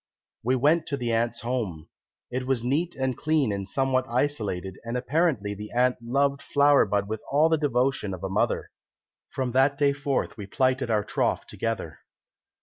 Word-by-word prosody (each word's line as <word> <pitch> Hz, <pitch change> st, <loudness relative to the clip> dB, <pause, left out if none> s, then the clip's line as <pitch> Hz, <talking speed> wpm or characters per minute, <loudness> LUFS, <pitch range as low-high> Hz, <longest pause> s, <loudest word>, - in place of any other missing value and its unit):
We 125 Hz, +3 st, +2 dB
went 150 Hz, +6 st, +2 dB
to 140 Hz, -, -2 dB
the 120 Hz, -3 st, -1 dB
aunt's 115 Hz, +1 st, 0 dB
home. 110 Hz, -10 st, -3 dB, 0.4 s
It 130 Hz, +1 st, -3 dB
was 130 Hz, -3 st, 0 dB
neat 155 Hz, +8 st, 0 dB
and 130 Hz, -1 st, -1 dB
clean 150 Hz, -5 st, +1 dB
and 100 Hz, -1 st, -3 dB
somewhat 130 Hz, +2 st, +1 dB
isolated, 105 Hz, -8 st, -1 dB
and 115 Hz, +2 st, -3 dB
apparently 130 Hz, -, 0 dB
the 105 Hz, +1 st, -8 dB
aunt 125 Hz, +1 st, +3 dB
loved 140 Hz, +4 st, +1 dB
Flower 145 Hz, -3 st, +4 dB
bud 100 Hz, 0 st, 0 dB
with 110 Hz, 0 st, -4 dB
all 150 Hz, +3 st, +4 dB
the 160 Hz, -, +3 dB
devotion 130 Hz, -6 st, +1 dB
of 90 Hz, -, -12 dB
a -, -, -1 dB
mother. 95 Hz, -, 0 dB, 0.6 s
From 130 Hz, -2 st, -2 dB
that 135 Hz, +3 st, +3 dB
day 140 Hz, -1 st, +3 dB
forth 140 Hz, -3 st, -2 dB
we 100 Hz, -2 st, -7 dB
plighted 130 Hz, +3 st, +1 dB
our 105 Hz, -2 st, +2 dB
troth -, -, -1 dB
together. -, -, -4 dB
130 Hz, 175 wpm, -26 LUFS, 110-140 Hz, 0.6 s, Flower